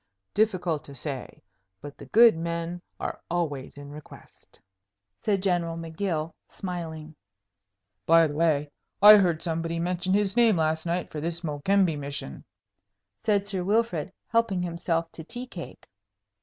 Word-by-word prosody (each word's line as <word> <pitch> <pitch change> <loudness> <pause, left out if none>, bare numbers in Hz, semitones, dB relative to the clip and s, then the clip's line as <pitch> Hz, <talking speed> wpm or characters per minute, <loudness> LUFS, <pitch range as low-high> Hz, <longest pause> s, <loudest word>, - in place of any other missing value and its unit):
"Difficult 185 -7 +1
to 140 - -10
say. 135 -1 -6 0.4
But 145 0 -9
the - - -10
good 230 -2 +7
men 170 +1 -4 0.2
are - - -4
always 145 -6 -3
in 145 0 -9
request," 150 +1 -14 0.6
said 200 -3 0
General 175 -3 0
M'Gill, 165 -1 -3
smiling. 160 -4 -6 0.9
"By 165 0 +7
the 150 - -3
way, 150 -2 +1 0.3
I 210 +1 +10
heard 175 -5 +1
somebody 165 0 -2
mention 180 +2 0
his 205 0 +1
name 230 -5 +5
last 160 +1 0
night 175 +1 -2
for 150 - -5
this 170 +1 -3
Mokembe 165 +2 +1
mission," 140 - -5 0.8
said 205 -3 +2
Sir 195 -3 -2
Wilfrid, 200 -5 0 0.2
helping 230 -6 +1
himself 170 -1 -2
to 160 - -8
tea 245 +9 -6
cake. 180 -9 -10
170 Hz, 140 wpm, -27 LUFS, 155-195 Hz, 0.9 s, I